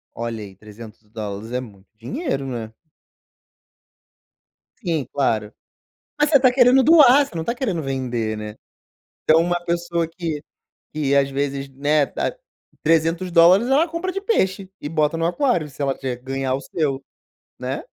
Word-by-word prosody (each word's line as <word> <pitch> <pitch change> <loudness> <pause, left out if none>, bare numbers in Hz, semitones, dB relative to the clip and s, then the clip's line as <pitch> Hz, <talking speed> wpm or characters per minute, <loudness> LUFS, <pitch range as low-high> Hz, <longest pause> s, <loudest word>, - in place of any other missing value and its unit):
Olha 115 -2 -4
aí, 95 -2 -11
$300 105 0 -9
é 125 - -1
muito 100 -5 -14
dinheiro, 235 - -3
né. 115 -4 -5 2.1
Sim, 160 -6 0
claro. 110 -6 0 0.7
Mas 295 +1 +2
você 290 - +6
está 260 -2 +5
querendo 255 +1 +5
doar, 285 -2 +7
você - - -16
não 165 - -2
está 235 - -2
querendo 200 - -2
vender, 125 -5 -2
né. 105 0 -7 0.7
Então 160 +1 +5
uma 175 +1 0
pessoa 170 -1 -1
que 165 -3 -4 0.5
que 145 -2 0
às 140 -1 +3
vezes, 140 0 -2
né, 145 +2 +1
ah, - - -1 0.5
$300, 170 +5 +4
ela 285 +5 +4
compra 335 +3 -3
de 390 +1 -4
peixe 195 - 0
e 145 - -5
bota 155 0 +1
no 165 - +1
aquário, 175 - 0
se 140 +1 -8
ela 135 -1 0
tiver 130 -2 -4
que 125 - -22
ganhar 135 0 -2
o 135 - -2
seu, 140 -4 -2 0.6
né. - - -4
150 Hz, 155 wpm, -21 LUFS, 130-185 Hz, 2.1 s, doar